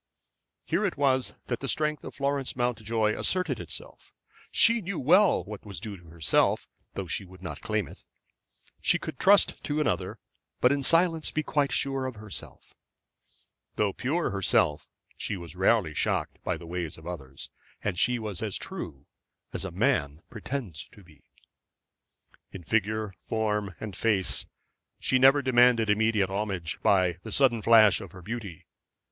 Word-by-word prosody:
Here -, -, 0 dB
it 195 Hz, -7 st, -1 dB
was 130 Hz, -2 st, +1 dB
that 120 Hz, -, -3 dB
the 135 Hz, -, -4 dB
strength 150 Hz, 0 st, 0 dB
of -, -, -8 dB
Florence 140 Hz, -1 st, -1 dB
Mountjoy 115 Hz, -3 st, 0 dB
asserted 180 Hz, -10 st, -1 dB
itself. 85 Hz, -, -9 dB, 0.4 s
She 230 Hz, 0 st, +5 dB
knew 195 Hz, -1 st, -4 dB
well 180 Hz, +8 st, +4 dB
what 105 Hz, -1 st, -9 dB
was 100 Hz, -5 st, -8 dB
due 105 Hz, +2 st, -4 dB
to 90 Hz, -3 st, -16 dB
herself, 80 Hz, -2 st, +1 dB, 0.3 s
though -, -, -3 dB
she -, -, -3 dB
would 95 Hz, 0 st, -15 dB
not 85 Hz, -, -6 dB
claim 110 Hz, -4 st, -1 dB
it. -, -, -13 dB, 0.8 s
She -, -, +4 dB
could 125 Hz, -, -7 dB
trust 200 Hz, +1 st, +4 dB
to 145 Hz, +1 st, -1 dB
another, 90 Hz, -, -1 dB, 0.4 s
but 125 Hz, -, +4 dB
in 140 Hz, 0 st, +1 dB
silence 165 Hz, +2 st, +3 dB
be 155 Hz, -, -2 dB
quite 145 Hz, -2 st, 0 dB
sure 135 Hz, -1 st, 0 dB
of 130 Hz, -, -6 dB
herself. 105 Hz, -1 st, -9 dB, 1.0 s
Though 100 Hz, -2 st, +1 dB
pure 155 Hz, +7 st, -1 dB
herself, 85 Hz, -6 st, +1 dB, 0.3 s
she 100 Hz, -, -3 dB
was 85 Hz, -1 st, -9 dB
rarely 95 Hz, -3 st, +2 dB
shocked -, -, -1 dB
by -, -, -1 dB
the -, -, -11 dB
ways 85 Hz, -1 st, -4 dB
of 80 Hz, -, -14 dB
others. 70 Hz, -7 st, -8 dB, 0.3 s
And 95 Hz, -4 st, -2 dB
she 125 Hz, 0 st, +3 dB
was 105 Hz, -5 st, -5 dB
as 105 Hz, -4 st, -1 dB
true 70 Hz, +1 st, -7 dB, 0.5 s
as -, -, -3 dB
a 95 Hz, -, -4 dB
man 85 Hz, -, 0 dB
pretends 110 Hz, -, -5 dB
to 105 Hz, -5 st, -16 dB
be. 80 Hz, -4 st, -20 dB, 1.3 s
In 95 Hz, -, -9 dB
figure, 110 Hz, +2 st, 0 dB
form, 105 Hz, -4 st, -2 dB
and 105 Hz, -4 st, -6 dB
face 100 Hz, -5 st, +1 dB, 0.5 s
she 130 Hz, -, +2 dB
never 135 Hz, +2 st, +6 dB
demanded 120 Hz, -3 st, +4 dB
immediate 105 Hz, -2 st, +2 dB
homage 95 Hz, -4 st, -3 dB
by 90 Hz, -3 st, +3 dB
the 110 Hz, -, -8 dB
sudden 120 Hz, -2 st, +3 dB
flash 110 Hz, -3 st, +6 dB
of 95 Hz, -, -10 dB
her 90 Hz, -1 st, -11 dB
beauty. 105 Hz, -5 st, -6 dB
110 Hz, 160 wpm, -28 LUFS, 95-130 Hz, 1.3 s, never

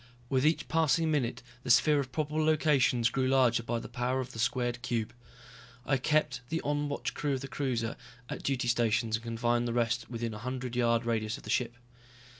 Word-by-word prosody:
With 135 Hz, +2 st, +3 dB
each 160 Hz, -, +1 dB
passing 160 Hz, 0 st, +2 dB
minute 125 Hz, -4 st, -1 dB, 0.2 s
the 125 Hz, -, -7 dB
sphere 145 Hz, +4 st, +5 dB
of 130 Hz, -2 st, -3 dB
probable 155 Hz, +3 st, -1 dB
locations 145 Hz, -7 st, +3 dB
grew 130 Hz, 0 st, 0 dB
larger 130 Hz, -3 st, +3 dB
by 115 Hz, 0 st, -2 dB
the -, -, -6 dB
power 125 Hz, +2 st, -1 dB
of 130 Hz, -1 st, -4 dB
the 115 Hz, -, -9 dB
squared 120 Hz, +1 st, 0 dB
cube. 115 Hz, -3 st, -2 dB, 0.7 s
I 135 Hz, -, +2 dB
kept 145 Hz, -1 st, +1 dB
the 165 Hz, -, -1 dB
on 145 Hz, 0 st, -1 dB
watch 145 Hz, -, -3 dB
crew 145 Hz, -1 st, -1 dB
of 130 Hz, -, -4 dB
the 135 Hz, -, -5 dB
cruiser 125 Hz, -5 st, -2 dB, 0.3 s
at -, -, -5 dB
duty 130 Hz, -3 st, -1 dB
stations 115 Hz, -1 st, +2 dB
and 110 Hz, -, -5 dB
confined 120 Hz, +1 st, 0 dB
the 120 Hz, -, -2 dB
rest 120 Hz, +1 st, 0 dB
within 115 Hz, -1 st, -3 dB
a -, -, -6 dB
one 105 Hz, -, -11 dB
hundred 125 Hz, -1 st, -4 dB
yard 115 Hz, -1 st, +2 dB
radius 110 Hz, -2 st, -1 dB
of -, -, -14 dB
the -, -, -5 dB
ship. 120 Hz, -1 st, 0 dB
125 Hz, 210 wpm, -30 LUFS, 115-140 Hz, 0.7 s, sphere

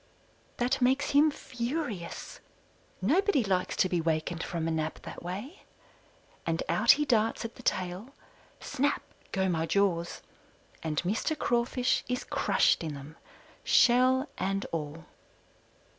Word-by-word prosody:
That 255 Hz, +3 st, 0 dB
makes 265 Hz, +4 st, +2 dB
him 290 Hz, +2 st, +6 dB
furious 245 Hz, -, -4 dB, 0.6 s
nobody 335 Hz, -, +3 dB
likes 185 Hz, -3 st, 0 dB
to -, -, +3 dB
be 175 Hz, -2 st, 0 dB
wakened 160 Hz, +1 st, -1 dB
from 165 Hz, -2 st, -3 dB
a -, -, 0 dB
nap 155 Hz, -1 st, -2 dB
that -, -, -8 dB
way 205 Hz, -, -6 dB, 0.8 s
and 165 Hz, 0 st, -1 dB
out 215 Hz, +8 st, +6 dB
he 295 Hz, +1 st, 0 dB
darts 225 Hz, -3 st, +1 dB
at 230 Hz, -, -5 dB
the -, -, -13 dB
tail; 185 Hz, +8 st, -2 dB, 0.4 s
snap 285 Hz, +3 st, -1 dB, 0.3 s
go 190 Hz, 0 st, +1 dB
my 165 Hz, -2 st, 0 dB
jaws, 175 Hz, -4 st, 0 dB, 0.6 s
and 155 Hz, -2 st, -3 dB
Mr. 220 Hz, -, -1 dB
Crawfish 245 Hz, 0 st, +1 dB
is 250 Hz, 0 st, -2 dB
crushed -, -, +2 dB
in 155 Hz, -3 st, -4 dB
them, 140 Hz, +3 st, -10 dB, 0.5 s
shell 255 Hz, +3 st, +4 dB
and 195 Hz, +1 st, -1 dB
all. 155 Hz, 0 st, -4 dB
200 Hz, 130 wpm, -29 LUFS, 170-255 Hz, 0.8 s, him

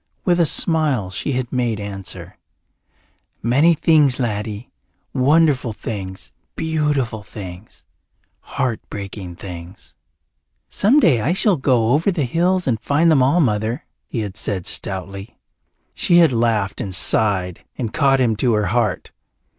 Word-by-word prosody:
With 180 Hz, -1 st, +2 dB
a 170 Hz, -, +4 dB
smile 145 Hz, -, +1 dB
she 100 Hz, +9 st, -3 dB
had 125 Hz, 0 st, -3 dB
made 120 Hz, -4 st, -1 dB
answer, 100 Hz, -2 st, -7 dB, 1.0 s
"Many 140 Hz, +9 st, +4 dB
things, 150 Hz, -4 st, +3 dB
laddie. 105 Hz, 0 st, -3 dB, 0.4 s
Wonderful 140 Hz, -3 st, +2 dB
things, 95 Hz, -3 st, -7 dB, 0.2 s
beautiful 150 Hz, -8 st, -1 dB
things, 95 Hz, -1 st, -11 dB, 0.5 s
heart 125 Hz, -5 st, -3 dB
breaking 95 Hz, -3 st, -7 dB
things." 85 Hz, -8 st, -10 dB, 0.8 s
"Some 245 Hz, +9 st, +3 dB
day 130 Hz, -, +3 dB
I 145 Hz, +10 st, +1 dB
shall 200 Hz, 0 st, +3 dB
go 125 Hz, -5 st, +1 dB
over 155 Hz, +8 st, +2 dB
the 170 Hz, -7 st, 0 dB
hills 180 Hz, +7 st, +1 dB
and 115 Hz, -4 st, 0 dB
find 160 Hz, +4 st, +2 dB
them 145 Hz, -4 st, +4 dB
all, 140 Hz, +7 st, +3 dB
Mother," 110 Hz, 0 st, -1 dB, 0.2 s
he 115 Hz, -, -3 dB
had 100 Hz, -3 st, -5 dB
said 95 Hz, -4 st, -3 dB
stoutly. 100 Hz, +3 st, -3 dB, 0.6 s
She 175 Hz, -, +2 dB
had 165 Hz, -6 st, +5 dB
laughed 115 Hz, -4 st, 0 dB
and 95 Hz, -3 st, -1 dB
sighed 95 Hz, -3 st, +1 dB
and 115 Hz, -4 st, -4 dB
caught 135 Hz, -2 st, +3 dB
him 120 Hz, -4 st, +2 dB
to 120 Hz, +2 st, +1 dB
her 105 Hz, -1 st, +1 dB
heart. 115 Hz, -6 st, -1 dB
120 Hz, 140 wpm, -20 LUFS, 100-150 Hz, 1.0 s, had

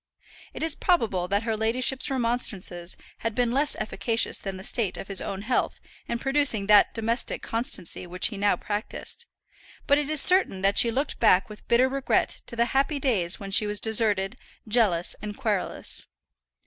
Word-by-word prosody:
It -, -, -5 dB
is 320 Hz, -, -1 dB
probable 210 Hz, -, 0 dB
that 200 Hz, +3 st, 0 dB
her 225 Hz, -1 st, -1 dB
ladyship's 245 Hz, +5 st, 0 dB
remonstrances 230 Hz, -8 st, -2 dB, 0.2 s
had 225 Hz, -1 st, -3 dB
been 245 Hz, -1 st, +1 dB
less 285 Hz, +4 st, +1 dB
efficacious 225 Hz, +1 st, -1 dB
than 195 Hz, -1 st, -6 dB
the 190 Hz, -, -10 dB
state 215 Hz, -1 st, 0 dB
of -, -, -8 dB
his 195 Hz, -2 st, +1 dB
own 195 Hz, 0 st, -5 dB
health 245 Hz, +3 st, -1 dB, 0.3 s
in 235 Hz, -, -2 dB
producing 270 Hz, -5 st, +2 dB
that 210 Hz, 0 st, +5 dB
domestic 230 Hz, +2 st, -2 dB
constancy 225 Hz, -, -3 dB
which 180 Hz, +1 st, -1 dB
he 220 Hz, -, -8 dB
now 200 Hz, +1 st, +2 dB
practised; 215 Hz, -, -5 dB, 0.6 s
but 285 Hz, +1 st, +3 dB
it 295 Hz, 0 st, -3 dB
is 310 Hz, -1 st, 0 dB
certain 360 Hz, -, +4 dB
that 195 Hz, +1 st, +3 dB
she 235 Hz, -, +6 dB
looked 270 Hz, +6 st, -2 dB
back 185 Hz, +3 st, +3 dB
with 210 Hz, -, -13 dB
bitter 240 Hz, +2 st, +4 dB
regret 270 Hz, 0 st, -1 dB
to 235 Hz, -, -8 dB
the 235 Hz, 0 st, +2 dB
happy 275 Hz, +2 st, +1 dB
days 195 Hz, -10 st, +1 dB
when 195 Hz, -1 st, -8 dB
she 210 Hz, +2 st, +3 dB
was 210 Hz, 0 st, +1 dB
deserted, 215 Hz, -1 st, +2 dB, 0.3 s
jealous, 210 Hz, -7 st, +3 dB
and 210 Hz, -1 st, -7 dB
querulous. 215 Hz, -7 st, -2 dB
225 Hz, 175 wpm, -25 LUFS, 200-255 Hz, 0.6 s, she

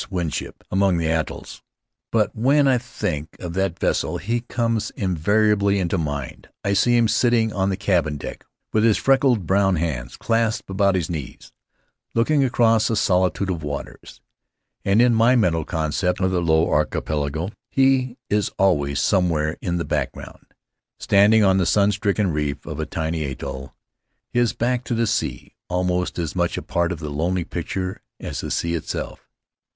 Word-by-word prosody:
Winship 90 Hz, -6 st, -4 dB
among 95 Hz, -1 st, +2 dB
the 85 Hz, -, -1 dB
atolls. 80 Hz, 0 st, -3 dB, 0.5 s
But 110 Hz, -3 st, +1 dB
when 140 Hz, +5 st, +3 dB
I 130 Hz, -2 st, +3 dB
think 80 Hz, -, -4 dB
of 90 Hz, -2 st, -6 dB
that 95 Hz, -2 st, -1 dB
vessel -, -, 0 dB
he 115 Hz, +4 st, -2 dB
comes 115 Hz, -2 st, -1 dB
inevitably 100 Hz, +3 st, +2 dB
into 90 Hz, -1 st, 0 dB
mind. 75 Hz, -4 st, -5 dB
I 100 Hz, -, +1 dB
see 120 Hz, +5 st, +3 dB
him 115 Hz, -1 st, +4 dB
sitting 115 Hz, -1 st, +2 dB
on 95 Hz, 0 st, 0 dB
the 95 Hz, -, -1 dB
cabin 85 Hz, -6 st, 0 dB
deck -, -, -8 dB, 0.3 s
with 110 Hz, -, +3 dB
his 115 Hz, -2 st, +4 dB
freckled 130 Hz, -7 st, +2 dB
brown 95 Hz, +1 st, +3 dB
hands 70 Hz, -7 st, -3 dB
clasped 115 Hz, -2 st, 0 dB
about 100 Hz, 0 st, +2 dB
his 85 Hz, -4 st, -1 dB
knees, 75 Hz, -7 st, -7 dB, 0.6 s
looking 140 Hz, +5 st, +3 dB
across 115 Hz, -4 st, +3 dB
a 115 Hz, -, +1 dB
solitude 95 Hz, -1 st, +1 dB
of 85 Hz, -3 st, -3 dB
waters; 70 Hz, -1 st, -7 dB, 0.6 s
and 100 Hz, +4 st, +4 dB
in 125 Hz, -1 st, +4 dB
my 115 Hz, +3 st, +4 dB
mental 85 Hz, -9 st, +2 dB
concept 80 Hz, +3 st, -1 dB
of 95 Hz, -1 st, +1 dB
the 90 Hz, -1 st, 0 dB
Low 80 Hz, -1 st, +3 dB
Archipelago 75 Hz, +2 st, -1 dB, 0.2 s
he 130 Hz, -2 st, +2 dB
is 105 Hz, 0 st, +1 dB
always 70 Hz, -7 st, +2 dB
somewhere 85 Hz, -5 st, +1 dB
in 85 Hz, -1 st, -1 dB
the 85 Hz, -, -2 dB
back -, -, -1 dB
ground, -, -, -12 dB, 0.5 s
standing 105 Hz, +2 st, +4 dB
on 95 Hz, -1 st, +4 dB
the 90 Hz, -, +1 dB
sun 100 Hz, +4 st, +3 dB
stricken 100 Hz, -2 st, 0 dB
reef 75 Hz, -2 st, -2 dB
of 75 Hz, -, -6 dB
a 80 Hz, -, -2 dB
tiny 80 Hz, 0 st, -2 dB
atoll, 70 Hz, 0 st, -6 dB, 0.6 s
his 120 Hz, -2 st, +2 dB
back 125 Hz, +1 st, -1 dB
to 120 Hz, -, -1 dB
the 115 Hz, +1 st, +1 dB
sea, 105 Hz, -, -2 dB, 0.2 s
almost 90 Hz, 0 st, -1 dB
as 85 Hz, -4 st, -3 dB
much 85 Hz, -1 st, 0 dB
a -, -, -4 dB
part 85 Hz, 0 st, 0 dB
of 90 Hz, -, -3 dB
the 75 Hz, -1 st, -6 dB
lonely 85 Hz, +5 st, -1 dB
picture 95 Hz, +3 st, -4 dB, 0.2 s
as -, -, -5 dB
the -, -, -5 dB
sea 85 Hz, 0 st, -1 dB
itself. 85 Hz, -, -5 dB
95 Hz, 170 wpm, -22 LUFS, 80-110 Hz, 0.6 s, him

